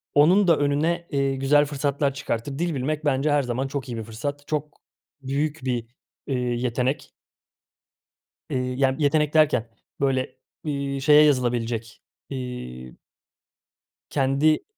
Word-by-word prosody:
onun 180 +7 +5
da 165 -3 +5
önüne, 155 +4 0
eee, 140 -1 +1
güzel 145 +2 +4
fırsatlar 140 0 -1
çıkartır. 135 +1 -4
Dil 170 -2 0
bilmek 150 +4 -2
bence 145 +1 +2
her 145 -1 +3
zaman 125 +2 -2
çok 135 -2 -5
iyi 120 - -4
bir 110 - -4
fırsat. 140 +7 -5
Çok 150 -1 -3 0.4
büyük 145 +3 -1
bir, 120 -3 -1 0.4
ııı, 130 - 0
yetenek. 125 +2 -1 1.4
Iıı, 125 - 0
yani 135 +1 +1
yetenek 150 +1 +2
derken, 145 -7 +3 0.3
böyle, 130 -1 0 0.3
ııı, 140 -2 -2
şeye 150 +2 +7
yazılabilecek, 120 -5 0 0.3
ııı 65 - -6 1.1
Kendi 140 +3 +2
140 Hz, 125 wpm, -24 LUFS, 125-150 Hz, 1.4 s, şeye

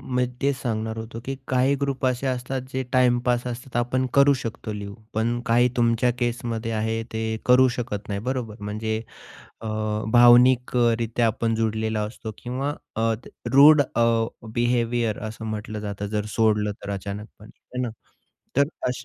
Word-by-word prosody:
मी 125 0 +3 0.2
तेच 140 0 +2
सांगणार 110 -2 -2
होतो 115 +1 -6
की 135 +1 -3
काही 130 +2 +2
ग्रुप 135 -1 -1
असे 130 +1 0
असतात 130 +1 -2
जे 130 - -1
टाईमपास 125 -1 +2
असतात, 125 +1 -7
आपण 130 +2 +1
करू 140 0 +6
शकतो 110 -1 -5
लीव्ह. 100 -1 -6 0.2
पण 115 +2 0
काही 120 +1 +4
तुमच्या 120 +1 +3
केसमध्ये 115 -1 -2
आहे 110 +1 -1
ते 110 0 -2 0.2
करू 125 +1 +6
शकत 105 -4 -4
नाही 100 0 -2
बरोबर. 120 -5 -3
म्हणजे 110 +2 -3 0.6
अ, 115 - -7 0.5
भावनिक 125 +1 +6
अ, 120 -1 +4
रित्या 115 +1 0
आपण 115 +1 0
जुडलेला 110 -1 -1
असतो 110 -2 -8
किंवा 130 +4 -3 0.2
अ, 115 +1 +2 0.4
रूड 145 +2 +8
अ, 120 -3 -1 0.5
बिहेवियर 120 -2 +1
असं 110 +1 -8
म्हटलं 110 0 -5
जातं 100 -1 -4
जर 105 - 0
सोडलं 105 -2 +2
तर 100 - -5
अचानकपणे 100 +2 -7 0.2
आहे 125 - -1
ना. 125 - -1 0.7
तर 140 0 +4 0.2
अश 125 +1 -4
120 Hz, 160 wpm, -24 LUFS, 110-125 Hz, 0.7 s, रूड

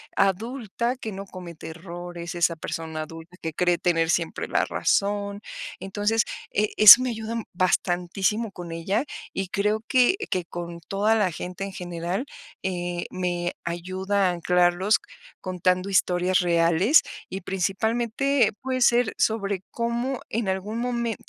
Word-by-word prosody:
adulta 230 +4 0
que 220 -4 -5
no 195 +1 -6
comete 170 -4 -9
errores, 175 +1 -7
esa 170 -1 +2
persona 160 -1 -4
adulta 165 +3 -11
que 160 -1 -4
cree 175 0 +2
tener 165 -2 +1
siempre 165 -2 -1
la - - +1
razón. 200 0 0 0.4
Entonces, 205 +3 0 0.3
eh, 210 +1 +1
eso 215 +4 +11
me 255 - 0
ayuda 225 +1 -4
bastantísimo 185 +4 0
con 175 -2 -8
ella, 190 +9 -1 0.3
y 195 - -2
creo 210 +3 0
que 255 +8 +4
que 180 -2 -1
con 170 0 -7
toda 205 +5 +1
la 200 -5 +2
gente 180 +4 -6
en 195 -1 -5
general, 175 +5 -3 0.4
eh, 175 -2 -2
me 175 -1 -2
ayuda 185 +3 -1
a - - +1
anclarlos 180 +3 +2 0.4
contando 185 +1 0
historias 185 -1 +2
reales 175 - +4 0.3
y, 190 +1 -5
principalmente, 225 +7 +1
puede 255 0 -2
ser 240 -2 +4
sobre 200 -4 0
cómo 235 +2 -2
en 220 -3 -1
algún 205 +4 -2
momen 235 -2 -1
190 Hz, 140 wpm, -25 LUFS, 175-220 Hz, 0.4 s, eso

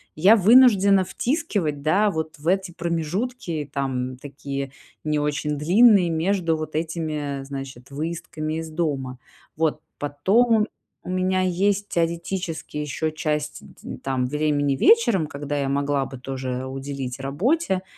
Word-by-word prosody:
я 190 +8 +6
вынуждена 200 -3 +6
втискивать, 195 - -1
да, 200 +7 +3
вот 160 -3 -4
в 150 - -8
эти 190 0 +1
промежутки, 170 - -3
там, 130 -2 -2
такие 140 0 -6 0.3
не 150 -1 0
очень 150 0 -1
длинные 190 +3 +5
между 165 0 +1
вот 155 0 -5
этими, 155 -4 -3
значит, 135 -2 -8
выездками 155 0 -4
из 160 -1 -5
дома. 140 -6 -2 0.4
Вот, 155 -1 0 0.2
потом 210 +11 +3 0.4
у - - -8
меня 185 0 +1
есть 195 +3 +1
теоретически 170 -1 -2
ещё 150 +1 -2
часть 150 -1 -2
ть - - -17
ть - - -7
там, 130 -2 -1
времени 145 0 +1
вечером, 235 - +4
когда 145 0 -5
я 140 -1 -1
могла 140 0 0
бы 135 - -9
тоже 130 0 -4
уделить 135 -1 -5
работе, 190 - 0
155 Hz, 135 wpm, -23 LUFS, 140-185 Hz, 0.4 s, я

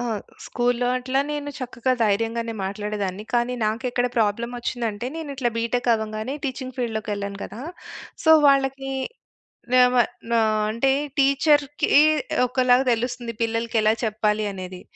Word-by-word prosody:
ఆ! - - -2 0.4
స్కూల్లో 245 0 0
అట్లా 260 +2 0
నేను 290 -1 -3
చక్కగా 255 0 -1
ధైర్యంగానే 225 +2 0
మాట్లాడేదాన్ని, 205 0 -3
కానీ 240 +1 +1
నాకెక్కడ 245 +3 0
ప్రాబ్లమోచ్చిందంటే, 235 +1 -1
నేనిట్లా 280 -6 -2
బీ‌టెక్ 240 +2 -1
అవ్వంగానే, 220 +4 -4
టీచింగ్ 260 -1 -4
ఫీల్డ్‌లోకెళ్ళాను 205 -4 -3
కదా! 225 - -9 0.6
సో, 320 - +7
వాళ్ళకీ 270 -1 +2 0.8
వేవా 250 -1 +6 0.3
నా 230 - +4 0.3
అంటే, 250 +4 +2 0.3
టీచర్‌కీ 280 +1 +3 0.6
ఒకలాగా 250 +1 +3
తెలుస్తుంది, 240 0 -3
పిల్లలకెలా 225 -1 +1
చెప్పాలి 215 -1 0
అనేది. 185 -1 -8
240 Hz, 110 wpm, -23 LUFS, 215-255 Hz, 0.8 s, సో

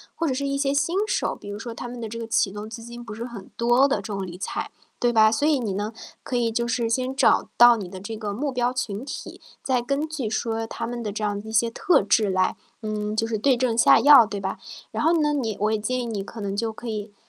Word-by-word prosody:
或 335 - -1
者 280 - +1
是 280 +2 -2
一 275 0 -1
些 275 0 +1
新 310 +6 +1
手， - - 0
比 - - -13
如 205 0 -6
说 235 0 -6
他 240 - -6
们 240 0 -7
的 225 - -4
这 230 - -6
个 230 - -4
启 225 -3 +1
动 210 +1 -7
资 230 +1 -8
金 235 +1 -9
不 215 - -7
是 230 +2 -5
很 235 -6 -9
多 240 +4 +4
的， 280 - +1
这 - - -5
种 195 -1 -3
理 175 -1 -8
财， 190 - -4 0.3
对 240 -1 +2
吧？ 220 -1 +6
所 285 +6 +1
以 300 -4 +3
你 210 -5 -2
呢， 210 +3 -3 0.3
可 250 - -4
以 235 -1 +1
就 235 +1 -1
是 235 -1 0
先 255 +3 -1
找 270 - +3
到 240 0 +8
你 195 -4 -5
的 185 +1 -9
这 215 +3 -6
个 210 -2 -4
目 275 +6 -2
标 250 0 0
群 230 -2 -3
体， 290 - -7 0.2
再 255 -2 0
根 280 +5 -1
据 280 -8 -3
说 225 +1 -2
他 230 0 -5
们 240 -1 -5
的 210 - -3
这 215 +1 -4
样 205 -1 -1
一 220 - -8
些 230 +1 +3
特 335 - +3
质 205 0 +2
来， 185 0 +1 0.3
嗯， 215 0 -3
就 225 +1 0
是 220 -2 -1
对 260 +4 +3
症 240 -2 0
下 230 - +7
药， 280 -2 +8
对 205 -1 -5
吧？ 190 - -3 0.3
然 - - -3
后 330 - +4
呢， 295 0 +2
你 235 -7 -1
我 210 +1 +1
也 220 - +2
建 255 +4 -2
议 240 - -3
你 205 -4 -3
可 220 +2 -9
能 200 -1 -3
就 225 +1 -2
可 235 +1 -9
以 210 -1 -4
230 Hz, 300 characters per minute, -24 LUFS, 215-255 Hz, 0.3 s, 到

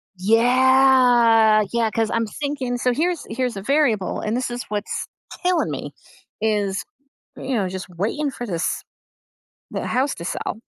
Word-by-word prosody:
Yeah. 240 0 +5
Yeah, 230 -2 +1
'cause 225 -1 0
I'm 230 0 0
just 215 - -10
thinking 275 -4 -2
so 250 0 +1
here's 340 +4 -1
here's 245 -1 -2
a 195 - -4
variable, 240 -6 +1
and 215 +2 -2
this 250 0 -1
is 245 +1 -4
what's 210 0 -3 0.4
killing 360 0 +1
me, - - -6 0.5
is, 205 -3 0 0.5
you 265 - -4
know, 200 -5 0
just 185 0 -6
waiting 220 - -2
for 245 -2 -7
this 175 -5 -2 0.9
the - - -4
house 270 +2 0
to 170 - -8
sell, 200 - -4
235 Hz, 155 wpm, -22 LUFS, 215-260 Hz, 0.9 s, Yeah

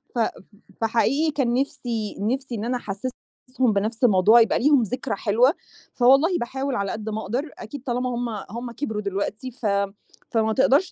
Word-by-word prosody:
ف - - 0
ف - - +4
ف - - +4 0.5
ف - - -46
فحقيقي 270 +8 +2
كان 265 -5 0
نِفْسي 240 -5 -2
نِفْسي 250 +4 -2
إن 215 +1 -4
أنا 250 +1 0
أحسِّسهم 215 +3 -5 0.5
بنَفْس 220 +4 -2
الموضوع، 215 +1 +6
يبقى 225 - +2
ليهم 280 -1 +4
ذكرى 250 +2 -3
حلوة، 235 - +3 0.4
فوالله 275 +8 +4
باحاول 265 +2 -3
على 200 -3 -1
قد 220 0 -5
ما 220 +1 -3
أقدر، 265 +8 -3
أكيد 240 +4 -8
طالمّا 250 0 -1
هم 240 0 -2 0.2
هم 235 +1 -5
كبروا 220 -4 -3
دلوقتي 200 +5 -3
ف 240 -1 -10 0.7
فما 220 -1 +2
تقدرش 280 - +3
240 Hz, 175 wpm, -24 LUFS, 220-265 Hz, 0.7 s, الموضوع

